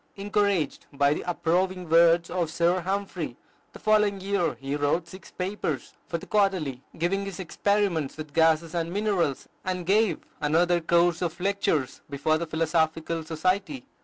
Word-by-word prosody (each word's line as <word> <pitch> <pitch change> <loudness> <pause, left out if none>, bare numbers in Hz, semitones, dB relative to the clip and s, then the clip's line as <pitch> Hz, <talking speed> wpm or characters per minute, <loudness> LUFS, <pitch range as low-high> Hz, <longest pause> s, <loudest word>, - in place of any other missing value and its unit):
Encouraged 200 -5 0
by 140 0 +3
the - - -4
approving 180 +2 0
words 170 +1 +5
of 175 -3 -1
Sir 170 +2 +2
Humphry, 195 +3 -3 0.3
the - - -11
following 210 -2 +2
year 190 -6 0
he 135 +4 -4
wrote 145 +4 0
six 190 +2 -12
papers 180 - -3
for 170 - -2
the - - -10
"Quarterly," 185 -11 +1 0.2
giving 185 +4 0
his 195 -2 -6
experiments 190 -4 0
with 155 -2 -8
gases 160 +1 +3
and 170 -1 -2
minerals, 195 -8 0 0.2
and 180 -1 -3
gave 210 +3 +2 0.2
another 170 +3 +2
course 170 +1 +3
of 175 -1 -2
lectures 180 -8 0
before 145 +3 +1
the 170 - -3
Philosophical 160 0 0
Society. 185 - -1
170 Hz, 150 wpm, -26 LUFS, 160-195 Hz, 0.3 s, words